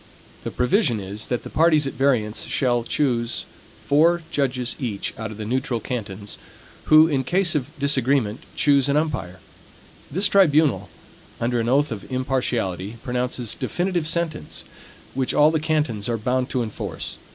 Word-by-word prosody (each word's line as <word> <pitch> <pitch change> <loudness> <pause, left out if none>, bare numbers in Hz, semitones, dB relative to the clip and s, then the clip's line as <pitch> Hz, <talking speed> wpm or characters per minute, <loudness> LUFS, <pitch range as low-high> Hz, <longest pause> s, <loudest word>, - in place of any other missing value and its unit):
The - - -3
provision 125 - +1
is, 100 +2 -6
that 125 - -2
the - - -7
parties 155 -2 +4
at 135 - -3
variance 120 -6 +1
shall 120 -3 +1
each 115 - -9
choose 120 -5 0 0.4
four 165 +4 +3
judges 130 -3 -1 0.4
out 110 -1 -5
of 105 - -9
the 110 - -5
neutral 125 +1 -1
cantons, 105 -5 -6 0.5
who, 155 +1 +7
in 140 -4 0
case 175 +5 +2
of 145 -2 -1
disagreement, 135 -5 +1 0.2
choose 140 -2 +3
an 140 - +3
umpire. 125 - -2 0.7
This 190 +7 +2
tribunal, 155 - +3 0.5
under 120 +1 0
an 115 +1 0
oath 145 +2 +2
of 110 +3 -7
impartiality, 120 -6 -2
pronounces 125 -2 -2
definitive 175 -3 -2
sentence, 165 -2 -2 0.5
which 130 -1 -1
all 150 +1 +6
the 160 - +1
cantons 150 -8 -1
are 115 - 0
bound 125 +4 -1
to 125 -2 0
enforce. 110 - -6
130 Hz, 150 wpm, -23 LUFS, 115-150 Hz, 0.7 s, who